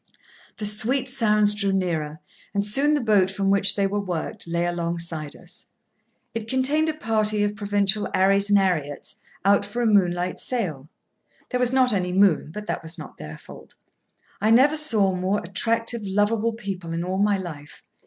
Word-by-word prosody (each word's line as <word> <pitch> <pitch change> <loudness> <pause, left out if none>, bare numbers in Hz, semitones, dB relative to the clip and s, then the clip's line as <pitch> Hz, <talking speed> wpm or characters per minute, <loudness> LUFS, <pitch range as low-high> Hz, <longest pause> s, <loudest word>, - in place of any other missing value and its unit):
The 210 - -3
sweet 235 +6 +1
sounds 210 -5 +3
drew 200 -1 0
nearer, 160 -5 -2 0.3
and 200 0 +1
soon 280 +8 +3
the 290 - 0
boat 205 -5 +3
from 195 0 -1
which 200 0 +4
they 200 - +1
were 205 +1 -1
worked 190 +1 -3
lay 170 +1 -1
alongside 170 -3 -3
us. - - -10 0.7
It 225 -1 -5
contained 280 +6 +1
a - - -1
party 215 -5 0
of 205 0 -1
provincial 205 0 0
'Arrys 195 +1 +2
and 205 - +5
'Arriets, 165 -7 -2 0.3
out 200 +1 +4
for 205 +4 -6
a 240 - +1
moonlight 180 -4 +1
sail. 160 - -4 0.6
(There 250 - -1
was 250 -1 +2
not 255 -2 +3
any 180 -2 -1
moon, 190 -6 +3
but 210 +6 -8
that - - -3
was 165 +2 -8
not 155 - -11
their 75 +1 -8
fault.) - - -14 0.7
I 215 - +2
never 265 +7 +5
saw 220 -11 +3
more 185 +2 -1
attractive, 230 +5 -1
lovable 210 +3 0
people 195 -7 -6
in 165 +1 -2
all 185 +2 -3
my 205 0 +2
life. 155 -6 -9
200 Hz, 175 wpm, -23 LUFS, 180-220 Hz, 0.7 s, and